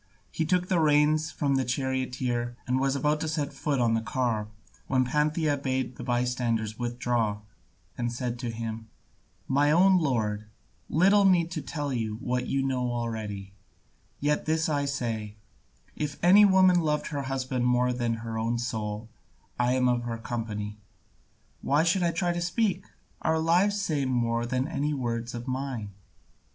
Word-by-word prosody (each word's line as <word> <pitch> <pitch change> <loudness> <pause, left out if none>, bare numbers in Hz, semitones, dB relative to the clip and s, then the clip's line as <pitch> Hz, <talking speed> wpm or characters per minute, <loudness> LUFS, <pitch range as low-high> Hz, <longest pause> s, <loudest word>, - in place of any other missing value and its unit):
He 160 - -1
took 180 +1 +1
the 180 -2 +2
reins 155 0 +3
from 145 -3 -1
the 135 - +1
charioteer, 125 -2 -2
and 130 +1 +1
was 135 0 +1
about 150 +2 +1
to 160 - -1
set 150 -2 -2
foot 140 -3 -1
on 115 -2 +3
the 115 - +1
car, 115 -3 -1 0.4
when 130 -1 +2
Pantheia 150 +2 +1
bade 130 -2 -1
the - - -8
bystanders 120 -3 -1
withdraw, 120 -3 -1 0.6
and 120 -1 -1
said 120 0 -3
to 120 -1 -3
him, 115 -1 -5 0.6
"My 145 +2 +3
own 185 +4 +5
lord, 110 -8 -1 0.4
little 195 +5 +5
need 175 -3 +4
to 155 - -3
tell 145 0 -3
you 110 -3 -2
what 125 +1 -2
you 135 0 0
know 125 -2 0
already, 110 -5 -4 0.7
yet 150 +1 0
this 160 0 +1
I 145 -2 0
say, 115 -6 -3 0.6
if 145 -2 -3
any 200 +4 +8
woman 185 -2 +5
loved 150 -2 0
her 145 -3 -3
husband 130 -2 -1
more 125 0 +2
than 120 -2 -1
her 110 -1 -3
own 115 +2 0
soul, 110 -2 -3 0.5
I 125 +1 +3
am 130 -1 +2
of 120 -1 +2
her 115 -1 -3
company. 110 -3 -4 0.8
Why 145 +3 +2
should 175 +3 +2
I 175 - +3
try 175 +1 0
to 175 - -3
speak? 185 +1 0 0.4
Our 160 0 +1
lives 180 +6 +3
say 155 -8 0
more 120 -2 0
than 130 +2 0
any 150 -2 -1
words 120 -2 -3
of 120 +2 -6
mine. 130 -5 -3
130 Hz, 165 wpm, -27 LUFS, 120-150 Hz, 0.8 s, any